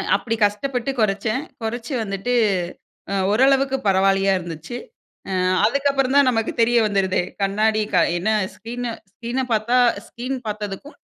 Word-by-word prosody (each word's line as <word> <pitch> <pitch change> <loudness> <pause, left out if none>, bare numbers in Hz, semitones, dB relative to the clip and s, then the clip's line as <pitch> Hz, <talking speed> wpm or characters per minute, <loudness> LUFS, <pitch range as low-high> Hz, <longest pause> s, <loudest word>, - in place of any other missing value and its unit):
அப்டி 225 -1 -1
கஷ்டப்பட்டு 245 +5 0
குறச்சன். 215 +4 0 0.2
குறச்சி 230 +4 -4
வந்துட்டு. 200 +4 -3 0.8
அ - - -1 0.2
ஓரளவுக்கு 270 +3 +3
பரவாயில்லையா 195 0 +3
இருந்துச்சு. 170 +4 -7 0.6
அ - - -1 0.3
அதுக்கப்புறம் 275 +2 +1
தான் 285 -1 +6
நமக்கு 225 -1 -1
தெரிய 240 +1 +4
வந்துடுதே. 195 -3 +1 0.2
கண்ணாடி 215 +2 +2 0.4
என்ன 185 +5 -1 0.3
ஸ்க்ரீன் 240 +2 -5 0.3
ஸ்கிரீன 240 +4 -3
பார்த்தா 225 +3 +2 0.3
ஸ்கீன் 255 +3 -4
பார்த்ததுக்கும், 210 +6 -5
225 Hz, 120 wpm, -22 LUFS, 200-255 Hz, 0.8 s, தான்